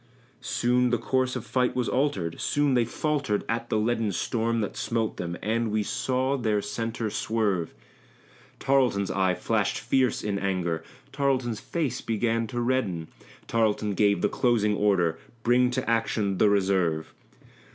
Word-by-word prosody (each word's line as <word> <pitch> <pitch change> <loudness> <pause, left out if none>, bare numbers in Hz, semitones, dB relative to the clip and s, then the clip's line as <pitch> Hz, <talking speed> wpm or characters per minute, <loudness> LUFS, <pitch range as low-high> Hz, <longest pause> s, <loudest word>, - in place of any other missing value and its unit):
Soon 125 +1 +1
the 120 - +2
course 130 +1 0
of - - -4
fight 125 -1 0
was 125 -2 0
altered; 105 - -1
soon 145 -2 +1
they 120 -2 +3
faltered 140 -4 -1
at 115 +1 -2
the - - +1
leaden 110 -1 0
Storm 115 +4 -1
that 105 - -3
smote 115 -2 -1
them, 85 0 -4
and 115 +2 0
we 105 0 0
saw 130 +5 0
their 110 -4 +1
centre 115 +1 -3
swerve. 100 -8 -1 0.8
Tarleton's 125 -8 +2
eye 95 -2 +1
flashed - - 0
fierce 130 -3 +1
in 100 -1 -1
anger; 90 -4 -1 0.3
Tarleton's 130 -5 0
face 155 -2 -2
began 115 +1 0
to 120 +3 -4
redden; 110 -10 -1 0.4
Tarleton 110 -2 +1
gave 100 -2 +2
the - - +5
closing 110 -4 +1
order 95 -6 +2 0.2
"Bring 125 +1 +4
to 130 +1 -2
action 110 -4 0
the 105 - +5
reserve!" 95 -6 +1
115 Hz, 150 wpm, -26 LUFS, 100-125 Hz, 0.8 s, the